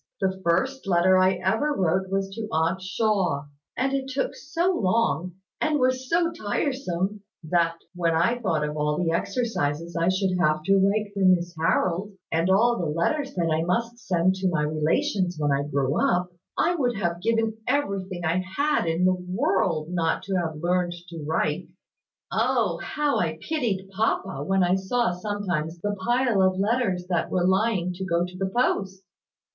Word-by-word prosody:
"The 190 Hz, -1 st, -1 dB
first 225 Hz, +10 st, 0 dB
letter 185 Hz, +1 st, +4 dB
I 185 Hz, 0 st, +4 dB
ever 225 Hz, +13 st, 0 dB
wrote 185 Hz, +1 st, +1 dB
was 195 Hz, 0 st, -1 dB
to 220 Hz, +1 st, -5 dB
Aunt 165 Hz, +4 st, +1 dB
Shaw; 185 Hz, -7 st, 0 dB, 0.3 s
and 270 Hz, +2 st, 0 dB
it 270 Hz, -1 st, -1 dB
took 270 Hz, 0 st, -2 dB
so 335 Hz, +5 st, 0 dB
long, 185 Hz, -, +1 dB, 0.3 s
and 305 Hz, -1 st, +2 dB
was 255 Hz, -1 st, 0 dB
so 335 Hz, 0 st, +2 dB
tiresome, 210 Hz, -, -2 dB, 0.2 s
that, 165 Hz, +1 st, +1 dB, 0.2 s
when 170 Hz, -2 st, +1 dB
I 230 Hz, +9 st, +2 dB
thought 160 Hz, -9 st, 0 dB
of 150 Hz, -, -5 dB
all 150 Hz, 0 st, 0 dB
the 175 Hz, -2 st, 0 dB
exercises 170 Hz, -, -1 dB
I 170 Hz, +1 st, +2 dB
should 185 Hz, -1 st, 0 dB
have 155 Hz, -2 st, +2 dB
to 195 Hz, +4 st, +4 dB
write 205 Hz, +1 st, +1 dB
for 200 Hz, -, -5 dB
Miss 180 Hz, -2 st, +3 dB
Harold, 175 Hz, +4 st, 0 dB, 0.2 s
and 165 Hz, +3 st, +1 dB
all 235 Hz, +5 st, +4 dB
the 170 Hz, -, -1 dB
letters 270 Hz, -, -1 dB
that 170 Hz, -2 st, 0 dB
I 155 Hz, +1 st, +2 dB
must 230 Hz, +7 st, -1 dB
send 180 Hz, -3 st, +1 dB
to 190 Hz, -1 st, +1 dB
my 160 Hz, -4 st, 0 dB
relations 160 Hz, +4 st, 0 dB
when 145 Hz, -1 st, +1 dB
I 140 Hz, +1 st, 0 dB
grew 140 Hz, -1 st, 0 dB
up, 180 Hz, 0 st, +1 dB, 0.3 s
I 350 Hz, -, +3 dB
would 250 Hz, -8 st, 0 dB
have 170 Hz, -3 st, -2 dB
given 225 Hz, +1 st, 0 dB
everything 195 Hz, -9 st, -1 dB
I 165 Hz, +2 st, +1 dB, 0.2 s
had 295 Hz, -, +2 dB
in 165 Hz, +2 st, +1 dB
the 185 Hz, -, +4 dB
world 180 Hz, -3 st, 0 dB
not 170 Hz, 0 st, 0 dB
to 195 Hz, 0 st, -4 dB
have 165 Hz, -3 st, -1 dB
learned 175 Hz, +2 st, 0 dB, 0.2 s
to 165 Hz, -2 st, -7 dB
write. 160 Hz, -, -1 dB, 0.6 s
Oh! -, -, +1 dB
How 295 Hz, -1 st, 0 dB
I 160 Hz, -2 st, -1 dB
pitied 195 Hz, -, -2 dB
papa, 195 Hz, -2 st, -1 dB
when 195 Hz, -1 st, +2 dB
I 175 Hz, 0 st, +3 dB
saw 190 Hz, +3 st, +1 dB
sometimes 175 Hz, -4 st, -3 dB
the 205 Hz, +3 st, -2 dB
pile 240 Hz, -3 st, +2 dB
of 185 Hz, 0 st, +3 dB
letters 200 Hz, -3 st, 0 dB
that 175 Hz, -2 st, 0 dB
were 180 Hz, -1 st, +1 dB
lying 190 Hz, -1 st, +1 dB
to 185 Hz, +2 st, -6 dB
go 170 Hz, -1 st, +1 dB
to 180 Hz, 0 st, -10 dB
the 190 Hz, +1 st, -2 dB
post!" 195 Hz, -4 st, 0 dB
185 Hz, 175 wpm, -25 LUFS, 170-220 Hz, 0.6 s, letter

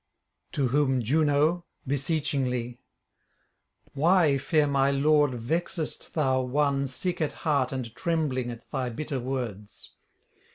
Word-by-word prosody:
To 135 Hz, -4 st, +1 dB
whom 135 Hz, -2 st, +2 dB
Juno 155 Hz, +6 st, +2 dB, 0.2 s
beseechingly: 135 Hz, -4 st, -1 dB, 1.1 s
'Why, 155 Hz, -1 st, +3 dB
fair 150 Hz, +2 st, +2 dB
my 140 Hz, -1 st, +2 dB
lord, 145 Hz, -1 st, +3 dB
vexest 160 Hz, +7 st, -3 dB
thou 130 Hz, -4 st, +2 dB
one 140 Hz, +1 st, +1 dB
sick 175 Hz, +7 st, -3 dB
at 155 Hz, -, 0 dB
heart 140 Hz, -5 st, +2 dB
and 125 Hz, -4 st, -4 dB
trembling 150 Hz, -8 st, -1 dB
at 115 Hz, -1 st, -9 dB
thy 130 Hz, -3 st, -1 dB
bitter 135 Hz, +3 st, -4 dB
words? 120 Hz, -6 st, -5 dB
140 Hz, 115 wpm, -27 LUFS, 125-155 Hz, 1.1 s, Why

